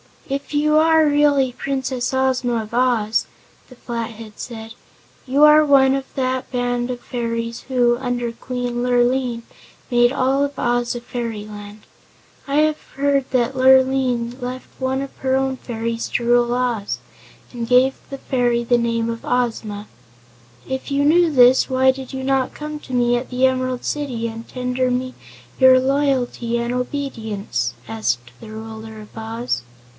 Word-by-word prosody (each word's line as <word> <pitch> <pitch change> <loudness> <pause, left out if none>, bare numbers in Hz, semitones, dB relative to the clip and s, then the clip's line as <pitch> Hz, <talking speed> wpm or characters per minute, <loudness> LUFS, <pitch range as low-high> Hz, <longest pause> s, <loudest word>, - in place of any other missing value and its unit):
"If 280 +1 -4
you 305 +1 +3
are 320 0 +5
really 290 -3 +3
Princess 260 -1 -2
Ozma 255 -3 0
of 215 - -13
Oz," 235 -3 +1 0.4
the 255 - -15
Flathead 230 -3 -6
said, 225 -2 -7 0.5
"you 275 +3 +3
are 300 0 +8
one 270 -2 +5
of 270 -1 -2
that 260 -1 -1
band 245 -1 -1
of 245 -1 -4
fairies 230 -1 -4
who, 245 -2 +2
under 245 -2 -2
Queen 245 0 -4
Lurline, 245 -1 +1 0.5
made 240 0 +4
all 275 +1 +1
Oz 240 0 0
a 240 - -5
Fairyland. 210 -3 -6 0.7
I 280 - -2
have 310 0 +1
heard 275 -1 +1
that 255 +1 0
Lurline 260 -2 +3
left 250 +1 -6
one 265 0 -1
of 275 - -7
her 260 0 0
own 265 0 0
fairies 230 -1 -4
to 240 - +1
rule 240 0 +3
Oz, 245 -5 -1 0.5
and 235 -2 -5
gave 255 +2 +4
the 275 - -6
fairy 245 -3 0
the 240 +1 +3
name 230 -1 0
of 230 0 -5
Ozma." 225 -4 -1 0.8
"If 265 +2 -4
you 280 0 +1
knew 335 +3 +4
this 255 -2 +5
why 260 0 +4
did 260 -1 -8
you 265 0 -4
not 270 -1 0
come 300 0 -6
to 260 - -10
me 245 -1 +3
at 245 - -5
the 255 +1 +2
Emerald 255 -1 0
City 255 -6 -2
and 225 0 -8
tender 250 0 -1
me 255 +1 -2 0.5
your 260 0 +7
loyalty 260 -3 0
and 235 +1 -2
obedience?" 220 - -3
asked 120 +2 -2
the 215 - -11
Ruler 220 0 -8
of 210 - -15
Oz. 225 - -3
250 Hz, 155 wpm, -20 LUFS, 235-265 Hz, 0.8 s, are